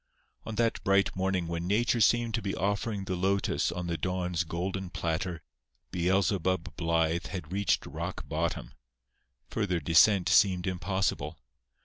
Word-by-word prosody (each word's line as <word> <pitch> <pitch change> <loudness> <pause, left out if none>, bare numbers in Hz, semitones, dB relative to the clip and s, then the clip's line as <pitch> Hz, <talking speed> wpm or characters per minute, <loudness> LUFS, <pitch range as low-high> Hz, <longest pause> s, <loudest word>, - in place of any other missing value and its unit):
On 110 - -4
that 115 0 0
bright 100 0 +2
morning 95 -2 0
when 85 +1 -3
Nature 115 +4 +2
seemed 120 +1 +3
to 115 - 0
be 100 -2 -2
offering 100 +2 -1
the 95 -1 -2
lotus 95 +2 +1
on 90 +1 -4
the 85 -2 -2
Dawn's 90 -1 -1
golden 90 +3 -3
platter 85 0 -3 0.5
"Beelzebub" 95 0 0
Blythe 85 0 0
had 90 -4 -6
reached 100 -1 +1
rock - - -5
bottom. - - -2 0.8
Further 95 -5 0
descent 85 +5 +5
seemed 95 -3 +4
impossible. 90 -4 -1
95 Hz, 135 wpm, -29 LUFS, 85-100 Hz, 0.8 s, descent